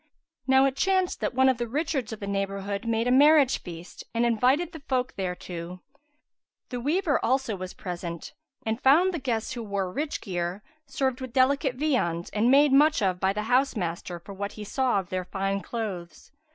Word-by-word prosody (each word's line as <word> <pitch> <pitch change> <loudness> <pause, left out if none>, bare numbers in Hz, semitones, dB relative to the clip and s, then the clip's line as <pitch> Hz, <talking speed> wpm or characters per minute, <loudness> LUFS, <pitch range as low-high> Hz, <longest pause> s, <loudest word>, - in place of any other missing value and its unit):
Now 265 0 +5
it 270 -1 0
chanced 375 +2 +1
that - - -2
one 260 +1 +5
of 260 -2 +2
the 240 - -2
richards 275 -2 -2
of 220 - -6
the 200 - -5
neighbourhood 200 +1 -3
made 230 0 +1
a - - +2
marriage 285 0 +5
feast 170 -1 -9
and 235 +1 +2
invited 255 +9 +2
the 320 - -9
folk 255 -1 0
thereto: 180 -1 -5 0.9
the 245 - -4
weaver 300 +4 +1
also 260 -3 +1
was 185 -1 -7
present 170 -2 -6 0.3
and 220 +2 -2
found 335 +8 +5
the 335 - -2
guests, 235 -4 -2
who 240 - -5
wore 200 -4 -3
rich 295 +1 -2
gear, 180 0 -3 0.2
served 265 -1 -1
with 260 -2 -6
delicate 265 +1 +2
viands 245 - -1
and 215 +3 +2
made 280 +1 +5
much 295 -3 +5
of 185 -2 +1
by 190 +1 +2
the 210 +2 -3
house 255 +4 +2
master 175 -2 -4
for 170 +4 -11
what 200 +1 -5
he 215 - -8
saw 255 +2 0
of 185 - -7
their 185 -1 -3
fine 195 +1 -2
clothes. 190 -9 -6
230 Hz, 190 wpm, -26 LUFS, 195-270 Hz, 0.9 s, Now